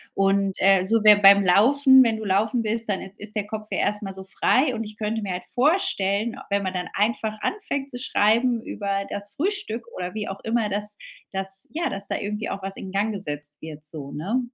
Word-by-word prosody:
Und, 195 0 +2
äh, 190 -1 +4
so 225 +1 +2
wäre 210 -1 +8
beim 200 0 +8
Laufen 265 +8 +6
wenn 225 -2 +1
du 220 - -6
Laufen 215 +5 +1
bist, 225 0 -2
dann 195 - -1
i 190 - -9
ist 210 +1 -8
der 210 -1 -1
Kopf 215 0 -6
ja - - -1
erst 210 +1 0
mal 195 -1 -6
so 190 - -8
frei. 255 +7 +2
Und 225 0 -3
ich 210 0 -10
könnte 220 +1 -2
mir 190 -3 -3
halt 180 0 -5
vorstellen, 245 - +1
wenn 200 0 0
man 185 0 -3
dann 180 -2 -3
einfach 215 0 -1
anfängt 285 -9 -3
zu 245 - -6
schreiben 235 +1 +2
über 200 -1 -3
das 205 0 -6
Frühstück 365 - -2
oder 180 +3 -5
wie 215 - -3
auch 195 - -6
immer, 225 -1 0
dass 210 +1 -1 0.3
dass 195 0 -2
ja, 340 +2 -1
dass 195 0 -5
da - - -2
irgendwie 210 +2 -4
auch 195 - -5
was 195 0 -4
in 190 - -8
Gang 205 +3 0
gesetzt 145 -6 -6
wird 155 -1 -9
so, 150 -2 -8
ne? 210 - -2
210 Hz, 225 wpm, -24 LUFS, 195-230 Hz, 0.3 s, wäre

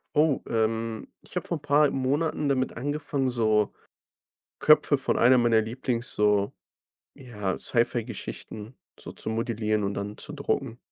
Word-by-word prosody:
Oh, 150 -2 +3
ähm, 115 0 -1
ich - - -8
habe 180 - -3
vor 170 - -1
‘n - - -16
paar 145 0 +4
Monaten 145 +3 0
damit 130 -1 0
angefangen, 145 0 -1
so 110 -4 +1 0.8
Köpfe - - +5
von - - 0
einer 125 +2 +6
meiner 120 -2 +4
Lieblings 120 +1 -3
so, 105 -1 +2 0.6
ja, 105 -8 -4
Sci-Fi-Geschichten 115 -1 -3 0.2
so - - -9
zu - - -5
modellieren 110 -2 -1
und 100 0 -2
dann 100 +1 -5
zu 150 - -8
drucken. 135 -4 -2
120 Hz, 145 wpm, -27 LUFS, 110-135 Hz, 0.8 s, einer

